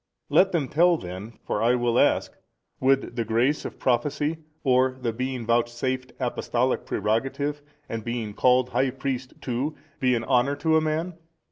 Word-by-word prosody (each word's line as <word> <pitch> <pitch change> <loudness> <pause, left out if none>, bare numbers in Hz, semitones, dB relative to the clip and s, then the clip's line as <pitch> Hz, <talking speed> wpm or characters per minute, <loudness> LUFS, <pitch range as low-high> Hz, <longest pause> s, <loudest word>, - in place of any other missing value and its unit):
Let 190 +1 +5
them 155 -6 0
tell 170 +4 +4
then, 95 - -7
for - - -1
I 120 +2 +4
will 120 -1 +1
ask: - - +2 0.4
Would 135 -2 +2
the 115 - 0
grace 120 +7 +1
of - - -6
Prophecy 145 +5 0 0.3
or 130 -1 +3
the 120 -3 -2
being 130 0 -3
vouchsafed 120 +2 0
apostolic 125 0 -1
prerogative, 135 +6 -1 0.3
and 115 -1 -4
being 115 -3 -3
called 125 +2 +3
High 130 +1 +1
Priest 130 -1 -4
too, 130 +5 -2 0.2
be 130 -2 +3
an 115 - -1
honour 130 +3 +2
to 160 +2 +1
a 160 - +5
man? 160 +3 -2
130 Hz, 160 wpm, -25 LUFS, 120-140 Hz, 0.4 s, Let